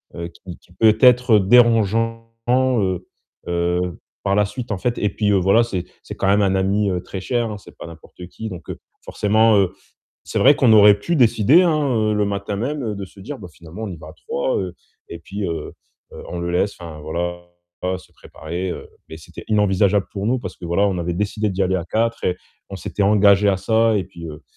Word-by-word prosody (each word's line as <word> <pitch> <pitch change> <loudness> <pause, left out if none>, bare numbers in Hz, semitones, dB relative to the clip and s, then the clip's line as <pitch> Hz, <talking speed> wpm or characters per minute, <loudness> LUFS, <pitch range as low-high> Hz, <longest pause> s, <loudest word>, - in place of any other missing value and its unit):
heu, 85 0 -5
qui 85 +1 -12
qui 90 - -24
peut 110 +3 +4
être 125 -3 +6
dérangeant, 115 +1 +3 0.2
heu, 120 -8 +1 0.4
heu, 85 0 -1 0.2
par 100 - 0
la 105 -1 +3
suite, 115 +3 -7
en 100 - -1
fait, 120 +4 -1
et 105 - +1
puis, 105 0 0
heu, - - +3
voilà, 100 +5 +4
c'est 95 -7 -3 0.2
c'est - - -8
quand 95 - -1
même 100 +1 +4
un 95 -1 +1
ami, 100 +2 +1
heu, 90 -2 -2
très 95 - -7
cher, 120 +3 -1
hein, 105 - -6
c'est - - -17
pas - - -9
n'importe 85 +2 -12
qui. 110 +4 -7
Donc 90 -3 -10
heu, - - -6 0.2
forcément, 110 +2 +2
heu, 95 -3 +2 0.5
c'est - - -3
vrai 140 +2 +6
qu'on 120 -4 +4
aurait 105 -1 +7
pu 170 +10 -1
décider, 125 - +5
hein, 155 -5 +1
heu, 110 -1 +1
le 105 0 +1
matin 100 0 -3
même, 140 +7 -3
heu, 110 -3 -3
de 100 - -5
se 100 - -20
dire: 135 +8 -7
«Bah, 95 - -10
finalement, 85 +7 -9
on - - -4
y 90 - -7
va 75 - -11
à - - -11
3. 70 - -2
Heu, 90 -2 -4 0.3
et 85 - -8
puis 100 +3 -6
heu, 80 -2 -5 0.4
heu, - - -10
on 90 - -5
le 85 0 -3
laisse, 95 +3 0
enfin 80 -3 -9
voilà, 85 +3 -4 0.6
se - - -19
préparer». 90 +2 -6
Heu, - - -7 0.2
mais 80 - -9
c'était 80 - -12
inenvisageable 100 -1 +2
pour 100 -1 -4
nous 125 +3 +1
parce 95 -6 -8
que - - -11
voilà, 95 +4 +2
on 95 - -2
avait 85 0 -2
décidé 105 +3 -1
d'y 95 +1 -1
aller 95 0 +1
à 85 - -3
4 115 +6 -1
et 90 0 0 0.3
on 100 - -6
s'était 100 - -4
engagé 100 0 +4
à 100 - +2
ça 110 +1 +2
et 95 - -1
puis, 85 -1 -11
heu, 75 0 -9
100 Hz, 230 wpm, -20 LUFS, 90-110 Hz, 0.6 s, aurait